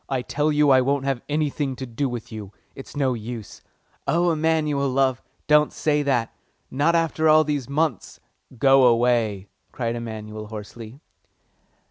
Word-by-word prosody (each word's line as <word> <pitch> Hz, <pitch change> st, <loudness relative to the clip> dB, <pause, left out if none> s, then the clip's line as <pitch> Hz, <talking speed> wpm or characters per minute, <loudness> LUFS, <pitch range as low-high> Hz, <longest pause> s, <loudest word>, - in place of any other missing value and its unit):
"I 130 Hz, -2 st, -1 dB
tell 150 Hz, +4 st, 0 dB
you 150 Hz, -1 st, +3 dB
I 130 Hz, -1 st, +6 dB
won't 135 Hz, +1 st, 0 dB
have 135 Hz, -3 st, -1 dB
anything 145 Hz, -2 st, -1 dB
to 130 Hz, -, -6 dB
do 130 Hz, +3 st, -2 dB
with 120 Hz, -1 st, -7 dB
you. 105 Hz, -3 st, -8 dB, 0.2 s
It's 135 Hz, -, -11 dB
no 135 Hz, -3 st, +1 dB
use." 115 Hz, -2 st, -7 dB, 0.5 s
"Oh 170 Hz, +2 st, +2 dB
no, 175 Hz, -, +3 dB
Emanuel, 155 Hz, -3 st, 0 dB
love, 130 Hz, -1 st, +1 dB, 0.2 s
don't 150 Hz, 0 st, +4 dB
say 150 Hz, -1 st, 0 dB
that; 130 Hz, -5 st, 0 dB, 0.4 s
not 150 Hz, +5 st, +2 dB
after 160 Hz, -1 st, +1 dB
all 155 Hz, 0 st, +6 dB
these 145 Hz, -4 st, -3 dB
months?" 155 Hz, +2 st, -2 dB, 0.4 s
"Go 135 Hz, +1 st, +5 dB
away!" 115 Hz, -4 st, +1 dB, 0.2 s
cried 115 Hz, -2 st, -3 dB
Emanuel 110 Hz, -2 st, -7 dB
hoarsely. 110 Hz, +3 st, -9 dB
135 Hz, 155 wpm, -23 LUFS, 115-150 Hz, 0.5 s, I